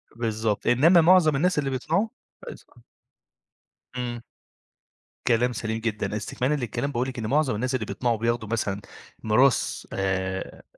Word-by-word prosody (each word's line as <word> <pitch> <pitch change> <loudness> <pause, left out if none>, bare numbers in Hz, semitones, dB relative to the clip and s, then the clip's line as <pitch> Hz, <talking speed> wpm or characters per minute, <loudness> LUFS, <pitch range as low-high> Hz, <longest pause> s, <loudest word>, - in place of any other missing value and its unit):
بالضبط. 110 -2 -2
إنّما 165 +8 +6
معظم 165 -3 +5
الناس 175 +2 +2
اللي 135 -2 -1
بيطمعوا 160 - 0 0.4
كويس - - -10
آه. - - -22 1.1
إمم. 120 -1 -4 1.0
كلام 120 +1 +3
سليم 110 0 -3
جدًا. 105 -2 -2
إستكمالًا 125 +6 -2
للكلام، 140 +2 -3
باقول 125 +1 -1
لِك 125 - -7
إن 110 - -3
معظم 140 -4 +1
الناس 125 +4 -1
اللي 110 -4 -2
بيطمعوا 120 -1 -1
بياخدوا 115 -1 -1
مثلًا 100 -3 -2 0.4
ميراث 125 +4 +2
آآ 95 -1 -3
120 Hz, 140 wpm, -25 LUFS, 110-135 Hz, 1.1 s, إنّما